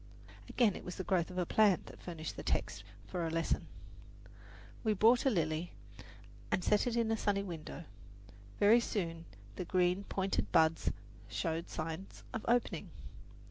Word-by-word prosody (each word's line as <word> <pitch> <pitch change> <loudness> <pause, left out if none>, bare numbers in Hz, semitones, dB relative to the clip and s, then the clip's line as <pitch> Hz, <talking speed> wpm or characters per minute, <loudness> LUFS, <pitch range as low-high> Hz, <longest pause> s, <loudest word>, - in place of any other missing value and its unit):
Again, 225 -6 +3
it - - -8
was 180 - -6
the 185 - -4
growth 180 -3 +1
of 180 - -8
a 180 - +1
plant 205 -1 +4
that - - -12
furnished 160 -3 -6
the - - -6
text - - -1 0.2
for 175 - -3
a 165 - 0
lesson. 165 0 0 1.2
We 215 -2 +2
bought 235 +6 +5
a - - +7
lily 165 -4 -1 0.8
and 185 - 0
set 210 +5 +3
it 240 - 0
in 230 -1 +1
a - - +3
sunny 200 -2 +1
window. 170 -2 -7 0.8
Very 215 +4 +7
soon 170 -8 -3 0.3
the - - -3
green, 180 +2 +2
pointed 195 0 -1
buds 160 0 +4 0.4
showed 165 +1 -2
signs 165 +4 -5
of 220 - -3
opening. 240 0 +1
185 Hz, 160 wpm, -34 LUFS, 165-210 Hz, 1.2 s, a